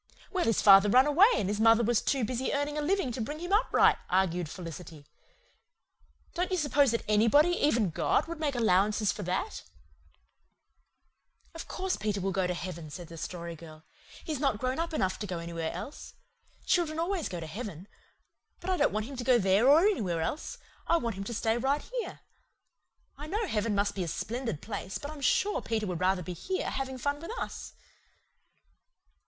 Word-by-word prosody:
"Well, 370 -2 0
his 225 - +1
father 195 0 +8
run 255 +5 +6
away, 310 +8 +6
and 190 - 0
his 205 +1 -2
mother 225 +1 +5
was 235 -1 +2
too 270 -3 0
busy 255 +3 -2
earning 285 +1 -1
a 300 - -1
living 340 -3 0
to 240 - -4
bring 295 +7 -4
him 350 +4 -4
up 430 +4 +2
right," - - +5
argued 180 -3 +1
Felicity. 165 -3 -9 1.3
"Don't 360 +1 -1
you 370 - 0
suppose 290 -3 +3
that 230 0 -1
anybody, 230 +10 +4
even 240 - +2
God, - - +1
would 335 -1 -6
make 295 -4 -1
allowances 210 -1 +2
for - - -7
that?" 185 - -3 1.9
"Of 330 - -8
course 375 0 -2
Peter 210 -2 -2
will 195 +1 -1
go 190 -1 0
to 180 - -2
heaven," 170 -3 -6
said 170 +2 -9
the 165 - -9
Story 170 0 -6
Girl. 155 -1 -13 0.4
"He's 305 -4 -3
not 270 -6 +1
grown 255 +5 -2
up 335 +1 -2
enough 190 -12 -1
to 210 - -4
go 180 -2 -4
anywhere 170 -1 -4
else. 290 - -8 0.5
Children 330 -3 +1
always 340 0 -1
go 175 - -5
to 165 - -6
heaven. 190 0 -7 0.7
But 375 - -3
I 370 - +1
don't - - +3
want 215 0 -2
him 270 +2 -8
to 245 - -3
go 250 0 +5
there 200 +4 +3
or 300 +3 +7
anywhere 205 - +1
else. 295 - -4 0.3
I 335 - +4
want 235 -7 -2
him 195 +1 -6
to 235 - -4
stay 225 +2 0
right 275 +4 0 0.2
here. - - -6 1.0
I 300 - -7
know 425 +7 -1
heaven 215 - -1
must 200 0 +1
be 190 - -3
a - - -4
splendid 230 - -4
place, 200 -2 -5
but 290 - -7
I'm 305 -2 -9
sure 400 +9 +2
Peter 220 -1 -2
would 180 -4 -3
rather 185 0 +1
be 180 - -5
here, 370 - -3
having 265 -1 -4
fun 285 +3 -2
with 335 - -8
us." - - -6
230 Hz, 195 wpm, -29 LUFS, 190-295 Hz, 1.9 s, father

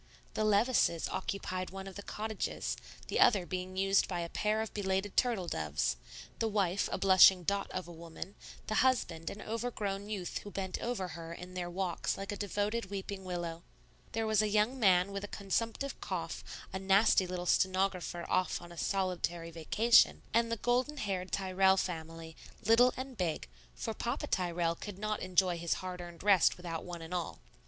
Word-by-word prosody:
The 215 - 0
Levices 215 -5 +3
occupied 185 -1 -3
one 195 +1 -7
of 195 - -8
the 200 - -7
cottages, 215 +1 -3 0.3
the - - -1
other 195 -6 +5
being 185 +1 -4
used 195 +1 +3
by 175 -2 -2
a 170 - -4
pair 210 +4 0
of 220 - -5
belated 195 0 -1
turtle 230 -8 +2
doves, 75 - -1 0.4
the 225 - +1
wife 200 -3 +1
a - - 0
blushing 190 -1 +7
dot 200 +3 0
of 185 -2 -4
a - - -9
woman, 170 +3 -8 0.3
the - - -3
husband 175 -11 +1
an 210 - -8
overgrown 210 -3 -3
youth 190 -5 -3
who 205 - -9
bent 190 -2 -4
over 225 -6 -2
her 165 0 -7
in 180 +1 -9
their 180 -1 -3
walks 180 -1 -2
like 195 +2 -5
a - - -3
devoted 205 +3 -1
weeping 195 0 -5
willow; 175 -2 -4 0.5
there 225 0 0
was 220 -1 +3
a 215 - +1
young 215 +5 +2
man 185 -3 +4
with 200 0 -4
a - - -4
consumptive 230 +7 -2
cough, - - -4 0.3
a 190 - -2
natty 195 0 +4
little 180 0 -4
stenographer 185 -2 +1
off 185 - +1
on 175 0 -11
a 170 - -8
solitary 175 -3 -1
vacation, 210 +9 +4
and 230 0 +3
the 230 - 0
golden 250 +6 +1
haired 190 -6 -3
Tyrrell 190 0 +3
family, 165 -2 -4 0.3
little 240 +3 +6
and 260 -1 -6
big, 170 -4 -1 0.3
for - - -3
Papa - - -2
Tyrrell 175 -2 0
could 195 +3 -8
not 215 +1 -2
enjoy 180 -1 +2
his 170 0 0
hard 180 -1 -5
earned 175 0 -9
rest 200 -4 +5
without 170 -2 -5
one 175 -2 -7
and 165 +2 -7
all. 175 -2 -3
190 Hz, 180 wpm, -33 LUFS, 175-210 Hz, 0.5 s, blushing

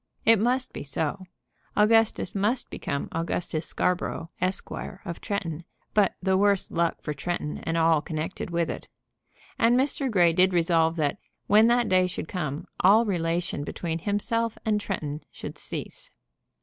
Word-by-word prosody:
It 225 -1 +6
must 250 +4 +1
be - - -5
so. 155 +6 -3 0.5
Augustus 215 -2 +3
must 210 +6 0
become 140 - -3
Augustus 165 -1 -2
Scarborough, 175 -2 -1
Esquire, 185 0 -2
of 170 -3 -6
Tretton, 175 -6 -3 0.3
but 205 -3 +3
the 190 0 +3
worse 200 -1 +2
luck 170 0 0
for 150 - -2
Tretton 150 +1 -3
and 165 0 0
all 165 -2 +4
connected 155 +4 -4
with 170 -1 0
it. - - -6 0.7
And 235 +2 +5
Mr. 275 0 0
Grey 175 -6 +4
did 185 +2 +4
resolve 165 -1 +3
that, 155 +3 0 0.3
when 215 +2 +6
that 240 -1 +3
day 185 -1 +4
should 175 - -5
come, 155 -3 -3
all 210 +5 +6
relation 170 -4 -1
between 165 +2 -3
himself 220 +4 -1
and 210 -1 +1
Tretton 150 -5 -4
should - - -8
cease. - - -6
180 Hz, 150 wpm, -26 LUFS, 165-210 Hz, 0.7 s, It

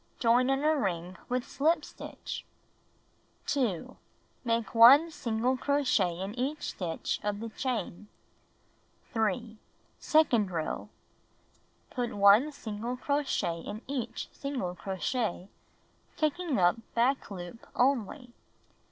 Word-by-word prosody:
Join 245 +1 +3
in 270 +1 +1
a 310 +1 +4
ring 180 - -2
with 250 0 -1
slip 310 +2 +1
stitch. - - -7 1.0
2. 245 - -1 0.5
Make 230 -4 -1
1 270 +8 +8
single 240 -1 0
crochet 250 -12 +1
in 195 +2 -4
each 265 +5 -2
stitch 170 -4 -3
of 205 0 -2
the 230 +1 -5
chain. 220 -5 -3 1.1
3. 220 0 -1 0.4
Second 245 -10 +3
row: 165 -3 -3 1.0
Put 245 -3 -3
1 205 +9 +6
single 230 -1 -5
crochet 275 - -1
in 210 +5 -7
each 245 -4 -4
single 260 -11 -4
crochet, 195 +1 -3 0.7
taking 310 -1 0
up 180 +4 +4 0.2
back 255 +4 +2
loop 185 +3 -8
only. 250 0 +1
235 Hz, 110 wpm, -30 LUFS, 205-275 Hz, 1.1 s, 1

